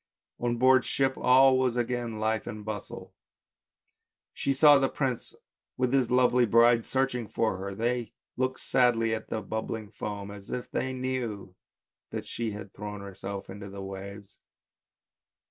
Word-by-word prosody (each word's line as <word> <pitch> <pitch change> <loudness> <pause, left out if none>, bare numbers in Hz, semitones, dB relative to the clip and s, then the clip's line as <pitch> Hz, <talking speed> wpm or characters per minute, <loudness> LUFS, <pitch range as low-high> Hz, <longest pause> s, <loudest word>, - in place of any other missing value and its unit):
On 120 0 0
board 130 +1 +5
ship 135 -1 +1
all 130 +1 +5
was 130 -2 +1
again 120 -2 -2
life 110 0 0
and 105 -1 -6
bustle, 110 -1 -7 1.2
she 140 - -1
saw 145 +1 +7
the 135 -1 +2
prince 130 -4 -3 0.4
with 125 0 +1
his 130 -4 +3
lovely 125 -1 +4
bride 115 +1 +5
searching 130 -3 -1
for 110 -2 0
her, 100 +1 -5
they 120 +2 -1 0.2
looked 130 +1 -1
sadly 115 -3 +2
at 110 - -5
the 110 -1 -3
bubbling 110 0 -4
foam, 100 -1 -5
as 100 -1 -11
if 125 - -5
they 130 - -1
knew 125 -7 -3 0.6
that - - -5
she 115 -1 -3
had 100 -2 -8
thrown 105 -1 -6
herself 100 0 -7
into 100 +1 -8
the 100 0 -7
waves. 100 +1 -9
115 Hz, 150 wpm, -28 LUFS, 105-125 Hz, 1.2 s, saw